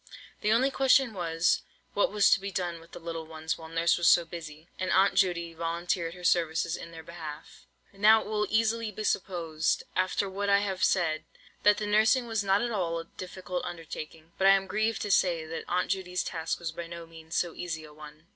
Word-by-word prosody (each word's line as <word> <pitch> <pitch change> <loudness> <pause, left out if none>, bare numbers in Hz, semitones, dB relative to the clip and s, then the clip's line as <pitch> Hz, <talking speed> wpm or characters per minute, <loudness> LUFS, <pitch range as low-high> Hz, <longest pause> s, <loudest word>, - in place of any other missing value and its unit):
The 210 - +2
only 255 +5 +3
question 265 -2 +4
was, 170 -2 +1 0.3
what 205 - +2
was 205 -1 +4
to - - +5
be 200 +1 -5
done 175 -3 -3
with 165 +1 -18
the - - -8
little 165 -1 -6
ones 160 0 -3
while 160 -1 -11
Nurse 165 +1 +2
was 170 - +3
so 175 - +6
busy; 160 -1 -9
and 185 - -1
Aunt 195 +1 +4
Judy 170 -3 +1
volunteered 170 +1 -2
her 180 - -12
services 165 -1 +2
in - - -8
their 165 -1 -10
behalf. 160 -3 -9 0.3
Now 215 +3 +6
it - - -8
will 210 -1 0
easily 225 0 +1
be 215 +1 -6
supposed, 165 -6 0
after 185 +2 +1
what 200 +1 -2
I 200 - +6
have 195 -2 -2
said, 160 -4 +2 0.4
that 205 0 +5
the 215 - -2
nursing 220 +4 +3
was 225 -3 -1
not 195 +2 +2
at 240 - -1
all 175 -6 -1
a 165 - -5
difficult 180 0 -6
undertaking; 165 -1 -8
but 195 - +4
I 195 - +8
am 195 0 0
grieved 215 +3 -1
to 205 - -2
say 170 -4 +2
that 165 +1 -6
Aunt 180 +1 0
Judy's 180 -2 -1
task 160 -2 -3
was 170 -2 -4
by 170 +1 -7
no 170 0 -8
means 165 0 -10
so 175 -2 0
easy 160 -3 -5
a 150 -1 -13
one. 155 +1 -13
175 Hz, 215 wpm, -29 LUFS, 165-200 Hz, 0.4 s, I